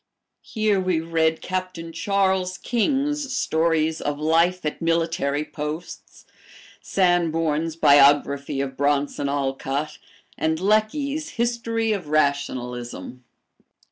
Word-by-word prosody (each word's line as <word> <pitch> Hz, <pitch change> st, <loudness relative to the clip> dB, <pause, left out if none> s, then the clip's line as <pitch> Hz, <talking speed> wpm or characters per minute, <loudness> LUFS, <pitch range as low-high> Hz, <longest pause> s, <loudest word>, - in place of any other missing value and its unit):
Here 215 Hz, -3 st, 0 dB
we 185 Hz, -3 st, 0 dB
read 160 Hz, -1 st, 0 dB
Captain 185 Hz, -3 st, -4 dB
Charles 190 Hz, 0 st, 0 dB
King's 275 Hz, +5 st, -1 dB
stories 160 Hz, 0 st, +1 dB
of 145 Hz, 0 st, -2 dB
life 165 Hz, +3 st, +2 dB
at 150 Hz, -, -3 dB
military 165 Hz, -3 st, 0 dB
posts, 155 Hz, +3 st, -7 dB, 0.6 s
Sanborn's 165 Hz, -3 st, +1 dB
"Biography 140 Hz, -2 st, +4 dB
of 135 Hz, -1 st, -4 dB
Bronson 145 Hz, 0 st, 0 dB
Alcott," 140 Hz, +1 st, -2 dB, 0.4 s
and 160 Hz, 0 st, 0 dB
Lecky's 245 Hz, -, 0 dB
"History 230 Hz, -1 st, 0 dB
of 195 Hz, -7 st, -2 dB
Rationalism." 125 Hz, -4 st, -2 dB
165 Hz, 95 wpm, -23 LUFS, 145-190 Hz, 0.6 s, Biography